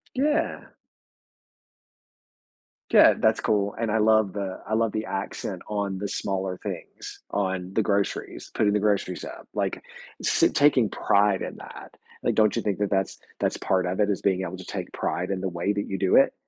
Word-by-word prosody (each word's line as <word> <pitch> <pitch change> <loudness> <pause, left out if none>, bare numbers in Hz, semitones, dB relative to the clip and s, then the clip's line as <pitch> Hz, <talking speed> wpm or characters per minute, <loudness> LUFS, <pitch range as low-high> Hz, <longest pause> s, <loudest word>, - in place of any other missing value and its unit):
Yeah. 300 +4 0 2.2
Yeah, - - +7
that's - - +3
cool, 100 -1 +1
and 115 -1 0
I 110 - +2
love 110 -2 +4
the 100 -2 -4
I 110 - -1
love 115 -1 +1
the 110 0 -3
accent 95 -1 -4
on 100 -2 -2
the 100 +1 -3
smaller 95 -2 -2
things, - - -7
on 95 -2 -2
the 110 - +2
groceries, 100 -1 -2
putting 105 -2 +2
the 105 - +2
groceries 100 -3 0
up, - - -9
like, - - -2 0.4
s - - +3
taking 135 -7 +4
pride 100 -1 +2
in - - -5
that. - - -11 0.3
Like, - - +1
don't 110 -2 +4
you - - 0
think 100 -3 -1
that 105 -1 0
that's 95 -1 0 0.2
that's - - 0
part 95 -1 0
of 90 +2 -2
it, 105 0 +3
is 100 - -1
being 95 -1 +1
able 95 0 -5
to 95 - -9
take - - -5
pride 90 +2 -2
in 95 -1 -1
the 95 - -1
way 90 +3 -1
that 100 0 -2
you 95 - -2
do 95 0 +3
it? - - +5
100 Hz, 190 wpm, -26 LUFS, 95-105 Hz, 2.2 s, Yeah